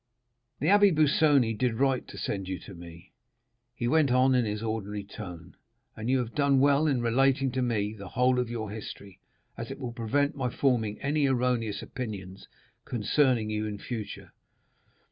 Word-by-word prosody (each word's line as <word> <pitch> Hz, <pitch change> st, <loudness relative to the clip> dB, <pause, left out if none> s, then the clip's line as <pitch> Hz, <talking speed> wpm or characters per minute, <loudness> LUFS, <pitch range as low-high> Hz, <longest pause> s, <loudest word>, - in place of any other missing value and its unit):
The 145 Hz, -, -2 dB
Abbé 200 Hz, 0 st, +5 dB
Busoni 145 Hz, -5 st, +4 dB
did 120 Hz, 0 st, 0 dB
right 135 Hz, +1 st, +1 dB
to -, -, -10 dB
send 95 Hz, -2 st, -3 dB
you 95 Hz, -1 st, -3 dB
to 100 Hz, -, -11 dB
me," 85 Hz, 0 st, -12 dB, 0.6 s
he 120 Hz, -, -2 dB
went 155 Hz, +1 st, +3 dB
on 130 Hz, +1 st, +4 dB
in 125 Hz, -2 st, +3 dB
his 105 Hz, +1 st, -3 dB
ordinary 105 Hz, -2 st, -3 dB
tone, 90 Hz, -4 st, -10 dB, 0.4 s
"and 110 Hz, +2 st, -4 dB
you 130 Hz, -, +3 dB
have 120 Hz, -2 st, -3 dB
done 140 Hz, -2 st, +3 dB
well 140 Hz, +3 st, +4 dB
in 135 Hz, -5 st, +1 dB
relating 135 Hz, +3 st, +2 dB
to 130 Hz, +1 st, -1 dB
me 110 Hz, -4 st, 0 dB
the 100 Hz, -3 st, -9 dB
whole 125 Hz, +3 st, +2 dB
of 125 Hz, -2 st, -1 dB
your 110 Hz, -3 st, -4 dB
history, 100 Hz, -2 st, -9 dB, 0.4 s
as 115 Hz, -, -5 dB
it 135 Hz, -, -6 dB
will 125 Hz, -4 st, -5 dB
prevent 135 Hz, +5 st, 0 dB
my 130 Hz, -3 st, -1 dB
forming 115 Hz, -5 st, 0 dB
any 145 Hz, 0 st, +2 dB
erroneous 125 Hz, -4 st, 0 dB
opinions 100 Hz, -6 st, -7 dB, 0.4 s
concerning 120 Hz, -1 st, +1 dB
you 105 Hz, 0 st, -2 dB
in 105 Hz, -1 st, -5 dB
future. 110 Hz, -1 st, -7 dB
120 Hz, 175 wpm, -28 LUFS, 105-135 Hz, 0.6 s, Abbé